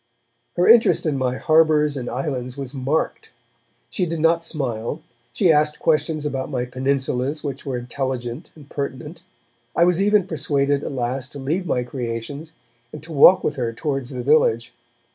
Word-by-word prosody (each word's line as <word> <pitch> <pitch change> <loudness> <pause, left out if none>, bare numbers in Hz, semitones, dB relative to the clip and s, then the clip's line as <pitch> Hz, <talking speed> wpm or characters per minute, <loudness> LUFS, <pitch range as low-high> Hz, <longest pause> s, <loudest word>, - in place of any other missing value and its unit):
Her 175 - +2
interest 230 -4 +5
in 155 -3 0
my 130 -1 -1
harbours 155 -2 +3
and 125 -3 -4
islands 130 0 -4
was 135 -1 -6
marked; 140 +4 -2 0.6
she 180 -3 -1
did 165 0 -3
not 165 +1 +3
smile; 125 -9 -3 0.3
she 165 +8 +3
asked 150 0 +2
questions 155 -1 0
about 135 -3 -3
my 125 -2 -2
peninsulas 130 +2 -2
which 140 -1 -5
were 130 -2 -2
intelligent 125 +1 -4
and 150 -3 -15
pertinent. 145 +3 -6 0.5
I 170 - +4
was 180 +1 +2
even 205 -1 +3
persuaded 145 -4 0
at - - -4
last 130 +1 -3
to - - -8
leave 160 +7 -2
my 125 -5 0
creations 125 +5 -5 0.4
and 150 - -9
to 160 0 -9
walk 180 +6 +7
with 145 - -1
her 120 -3 -2
towards 135 +1 -3
the 125 -2 -5
village. 120 -5 +2
140 Hz, 165 wpm, -22 LUFS, 125-155 Hz, 0.6 s, walk